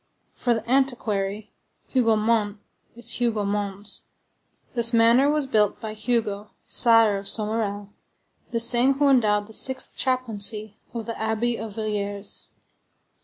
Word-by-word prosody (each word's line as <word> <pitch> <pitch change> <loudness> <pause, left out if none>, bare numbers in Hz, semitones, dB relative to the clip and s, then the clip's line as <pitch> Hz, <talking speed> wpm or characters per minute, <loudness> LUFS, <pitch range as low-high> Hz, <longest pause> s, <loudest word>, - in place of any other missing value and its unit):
For 240 -2 -1
the 225 0 -6
antiquary, 215 -6 -1 0.4
Hougomont 220 -3 +1 0.4
is 235 0 -2
Hugomons. 205 -3 -3 0.7
This 235 -1 +5
manor 235 +4 +4
was 300 -1 0
built 215 -6 +1
by 220 -1 -6
Hugo, 215 -2 -2 0.2
Sire 225 -4 +4
of 195 - -7
Somerel, 210 -2 -2 0.6
the 230 - -2
same 245 +3 +5
who 285 0 +2
endowed 210 -6 +2
the 220 - -14
sixth 260 +3 +2
chaplaincy 220 -4 -1
of 230 -2 -6
the 230 - -5
Abbey 220 +2 -1
of 220 -2 -8
Villiers. 205 -2 -3
220 Hz, 120 wpm, -23 LUFS, 210-240 Hz, 0.7 s, This